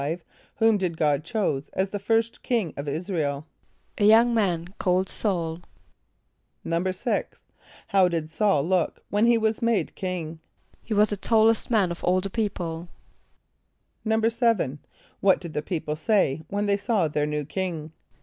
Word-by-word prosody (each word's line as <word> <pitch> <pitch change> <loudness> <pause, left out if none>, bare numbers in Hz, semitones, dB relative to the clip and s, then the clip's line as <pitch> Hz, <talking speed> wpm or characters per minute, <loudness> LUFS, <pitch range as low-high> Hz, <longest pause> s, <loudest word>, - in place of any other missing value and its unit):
= - - -31
Whom 225 -2 +4
did 175 -3 -2
God 150 -2 +1
choose 160 -6 -2
as 190 0 -1
the 205 - -3
first 225 +3 0
king 225 -10 -1
of 140 +1 -6
[)I][s+]´ra 165 +4 -2
el? 140 +1 -3 0.5
=A - - +2
young 230 +3 +6
man 180 -6 0
named 185 0 +2
S[a:]ul.= 170 -5 -1 1.0
=6.= 180 +3 -1 0.6
How 195 -3 +5
did 170 -3 -1
S[a:]ul 165 -5 +2
look 185 -2 0
when 210 +3 +3
he 235 -1 +5
was 220 -1 0
made 230 -8 +1
king? 170 -4 -4 0.4
=He 220 - -3
was 210 +1 +4
the 205 - -1
tallest 225 +2 +3
man 205 -7 +2
of 170 - -7
all 180 +1 +3
the 195 +1 -3
people.= 175 -6 -3 1.1
=7.= 220 - +1 0.4
What 195 -1 +4
did 170 -3 -8
the 150 - -1
people 155 -2 -3
say 160 -4 +1
when 205 +3 -1
they 200 -1 +2
saw 205 -4 +1
their 150 0 -1
new 150 -1 -2
king? 160 -2 -4
185 Hz, 160 wpm, -25 LUFS, 160-215 Hz, 1.1 s, young